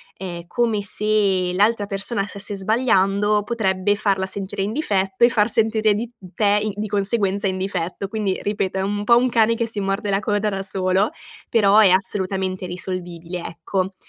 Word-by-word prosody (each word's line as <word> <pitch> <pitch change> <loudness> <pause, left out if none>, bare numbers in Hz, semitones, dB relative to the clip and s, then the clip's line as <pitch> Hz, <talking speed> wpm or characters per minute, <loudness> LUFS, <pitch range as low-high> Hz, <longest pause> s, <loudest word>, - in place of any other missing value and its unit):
ehm, 175 -2 -7
come 225 -1 0
se 200 -3 +1
l'altra 205 +2 +2
persona 200 +1 -2
stesse 200 0 -5
sbagliando, 205 -1 +2
potrebbe 205 -3 0
farla 195 -2 0
sentire 195 +1 -3
in 200 - -2
difetto 200 -6 +1
e - - +4
far 220 -2 +2
sentire 220 -1 +2
di 225 +3 -3 0.2
te 205 -1 +2
i 215 - -1
di 210 +1 -4
conseguenza, 200 0 +1
in 190 -1 -2
difetto. 185 0 -3
Quindi, 205 -2 -2
ripeto, 195 -2 -2
è - - 0
un 205 +1 -2
pò 235 +3 +5
un 255 - +3
cane 230 -1 +3
che 230 - -1
si 210 -2 -3
morde 195 +1 -2
la 195 0 +2
coda 210 0 0
da 195 -1 -3
solo, 190 +1 +1 0.4
però 210 -2 +4
è 210 -3 +7
assolutamente 190 0 -1
risolvibile, 175 -1 -5
ecco. 185 +3 -3
200 Hz, 175 wpm, -21 LUFS, 190-215 Hz, 0.4 s, è